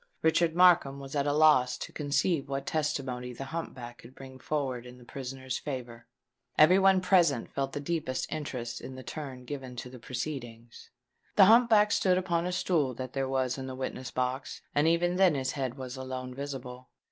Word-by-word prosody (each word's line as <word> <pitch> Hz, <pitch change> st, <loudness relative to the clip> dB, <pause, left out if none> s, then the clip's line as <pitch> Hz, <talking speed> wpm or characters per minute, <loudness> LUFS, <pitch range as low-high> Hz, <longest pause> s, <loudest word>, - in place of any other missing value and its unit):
Richard 160 Hz, 0 st, +3 dB
Markham 175 Hz, -6 st, +5 dB
was 135 Hz, +1 st, -8 dB
at 140 Hz, 0 st, +1 dB
a -, -, +2 dB
loss 145 Hz, -5 st, +4 dB
to -, -, -7 dB
conceive 145 Hz, 0 st, 0 dB
what 135 Hz, 0 st, -3 dB
testimony 130 Hz, -5 st, -2 dB
the 135 Hz, +3 st, -7 dB
hump 165 Hz, 0 st, -4 dB
back 120 Hz, -2 st, -9 dB
could 125 Hz, +3 st, -14 dB
bring 130 Hz, -1 st, -11 dB
forward 130 Hz, -5 st, -3 dB
in 125 Hz, 0 st, -12 dB
the 125 Hz, -, -16 dB
prisoner's 130 Hz, 0 st, -5 dB
favour. 120 Hz, -5 st, -6 dB, 0.5 s
Every 180 Hz, +5 st, +7 dB
one 190 Hz, -1 st, +5 dB
present 175 Hz, -9 st, +2 dB
felt 135 Hz, +3 st, -2 dB
the 145 Hz, -, -3 dB
deepest 150 Hz, -4 st, -2 dB
interest 125 Hz, -6 st, -4 dB
in 130 Hz, -, -8 dB
the 130 Hz, -, -9 dB
turn 130 Hz, -5 st, -7 dB
given 130 Hz, -2 st, -6 dB
to 125 Hz, +1 st, -7 dB
the 125 Hz, -, -11 dB
proceedings. 120 Hz, -2 st, -7 dB, 0.5 s
The 195 Hz, -, +8 dB
hump 230 Hz, +4 st, +6 dB
back 210 Hz, -2 st, +5 dB
stood 185 Hz, -1 st, +3 dB
upon 175 Hz, -2 st, 0 dB
a -, -, -2 dB
stool 160 Hz, -7 st, 0 dB
that 130 Hz, 0 st, -6 dB
there 135 Hz, -1 st, -1 dB
was 130 Hz, -1 st, 0 dB
in 130 Hz, -, -5 dB
the 130 Hz, -, -6 dB
witness 130 Hz, -1 st, -5 dB
box; 130 Hz, +1 st, -3 dB
and 145 Hz, +2 st, +3 dB
even 175 Hz, +2 st, +2 dB
then 185 Hz, -5 st, +5 dB
his 130 Hz, -1 st, -1 dB
head 135 Hz, -2 st, -3 dB
was 130 Hz, 0 st, -6 dB
alone 130 Hz, -1 st, -5 dB
visible. 130 Hz, -2 st, -7 dB
135 Hz, 195 wpm, -29 LUFS, 130-160 Hz, 0.5 s, The